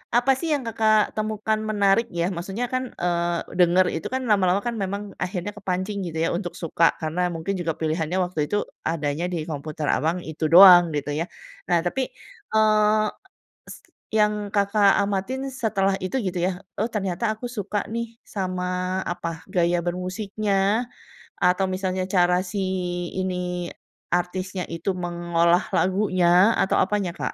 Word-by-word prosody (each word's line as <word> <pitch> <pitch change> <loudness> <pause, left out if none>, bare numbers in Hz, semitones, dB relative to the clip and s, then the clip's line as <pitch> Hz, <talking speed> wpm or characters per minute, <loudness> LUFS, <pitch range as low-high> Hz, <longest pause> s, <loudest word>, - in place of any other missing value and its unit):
apa, 245 +3 +4
sih, 335 - -3
yang 290 - 0
Kakak 220 -1 +3 0.2
temukan 215 0 -1
menarik, 205 +1 +3
ya, 170 - +2
maksudnya, 195 +7 -3
kan, 255 0 0 0.2
eee, 175 -1 -1
denger 180 +1 +5
itu, 160 - -3
kan, 260 - 0
lama-lama, 195 -2 +3
kan, 235 - -2
memang 200 +2 -3 0.2
akhirnya 185 +2 -3
kepancing 190 +1 -3
gitu, 160 -1 -5
ya, - - +1
untuk 180 -3 -5
suka, 165 0 +2 0.2
karena 160 +3 -2
mungkin 165 +4 -3
juga 165 -2 -1
pilihannya 160 +2 -1
waktu 175 -3 -6
itu 180 +8 -1 0.3
adanya 155 0 -1
di - - -1
komputer 155 +1 -4
Abang, 160 +6 +1
itu 160 +1 -3
doang 180 -1 +10
gitu, 145 -1 -2
ya. 165 - -1 0.4
Nah 175 -1 +3
tapi, 180 +10 -1 0.5
eee, 215 0 +4 1.1
yang 210 0 +4 0.2
Kakak 200 0 +4
amatin 200 +6 -2
setelah 195 -6 0
itu 185 +6 -4
gitu, 185 -2 -2
ya, - - 0 0.3
oh, 215 - +1
ternyata 195 -1 -2
aku 220 - -8
suka, 205 0 -2
nih, 235 0 -2 0.3
sama 185 -2 -2 0.4
apa, 165 -2 -5
gaya 175 -1 +2
bermusiknya, 195 +4 -1 0.5
atau 180 +2 +3
misalnya 185 0 -1
cara 180 0 +4
si 200 +2 -4 0.6
ini 180 -2 -2 0.4
artisnya 180 +1 -1
itu 165 +3 -3
mengolah 175 0 +2
lagunya? 185 0 +3
Atau 190 - +2
apanya 195 -2 0
Kak? - - -3
185 Hz, 145 wpm, -24 LUFS, 175-210 Hz, 1.1 s, doang